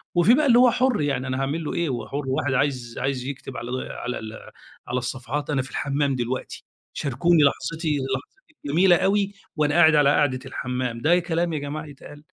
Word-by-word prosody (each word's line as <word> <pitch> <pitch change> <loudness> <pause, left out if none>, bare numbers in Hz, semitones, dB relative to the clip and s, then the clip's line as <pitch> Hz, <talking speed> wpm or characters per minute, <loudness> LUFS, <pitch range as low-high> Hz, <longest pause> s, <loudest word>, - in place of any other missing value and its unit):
وفي 175 +7 +5
بقى 300 +4 +3
اللي 240 -3 +6
هو 250 -1 +6
حر 255 -7 +1
يعني 135 -3 -1
أنا 130 0 -2
هاعمل 140 +5 -2
له 150 - -4
إيه، 170 -2 -1
هو 125 -3 -4
حر، 145 +1 -4
واحد 130 +1 0
عايز 125 -3 -1
عايز 130 -1 -2
يكتب 135 -1 -7
على 120 - -6 0.2
على 125 0 -4
ال 110 0 -8 0.5
على 125 - -2
الصفحات 130 +4 -4
"أنا 140 -3 +1
في 130 - -8
الحمام 140 +2 -1
دلوقتي، 125 +1 -4 0.3
شاركوني 155 +4 +2
لحظتي، 155 +2 0 0.2
لحظتي 300 - -12
الجميلة 175 +5 +4
أوي 200 +2 +1 0.2
وأنا 150 -2 +1
قاعد 160 -2 +6
على 145 -2 +5
قاعدة 145 -3 +2
الحمام." 125 -2 -4
ده 170 +6 +4
كلام 170 -1 -1
يا 155 - -1
جماعة 145 +2 -5
يتقال! 145 0 -13
145 Hz, 195 wpm, -24 LUFS, 130-165 Hz, 0.5 s, اللي